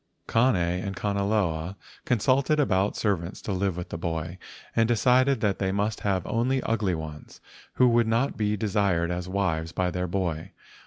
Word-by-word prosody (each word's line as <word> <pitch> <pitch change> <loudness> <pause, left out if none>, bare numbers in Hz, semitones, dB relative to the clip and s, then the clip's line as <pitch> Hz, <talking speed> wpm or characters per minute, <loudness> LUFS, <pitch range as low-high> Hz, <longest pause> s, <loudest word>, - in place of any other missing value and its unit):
Kane 120 +1 +3
and 90 +2 -1
Kanaloa 100 -4 -1 0.3
consulted 130 +5 +2
about 100 -7 +2
servants 95 -3 -1
to - - -3
live 95 -1 -1
with 90 - -5
the 80 - -5
boy, 85 +1 -3 0.4
and 115 -1 +3
decided 125 +2 +3
that 100 -3 +1
they 95 -1 0
must 105 +2 -1
have 95 -4 -1
only 125 +4 +1
ugly 105 -5 0
ones, 75 -2 -8 0.4
who 125 - +5
would 120 -1 +3
not 115 +5 +1
be 105 -1 0
desired 95 -5 +1
as 90 +1 -4
wives 85 -4 -1
by 90 +1 -1
their 90 0 -2
boy. 90 -1 -3
100 Hz, 165 wpm, -26 LUFS, 90-110 Hz, 0.4 s, who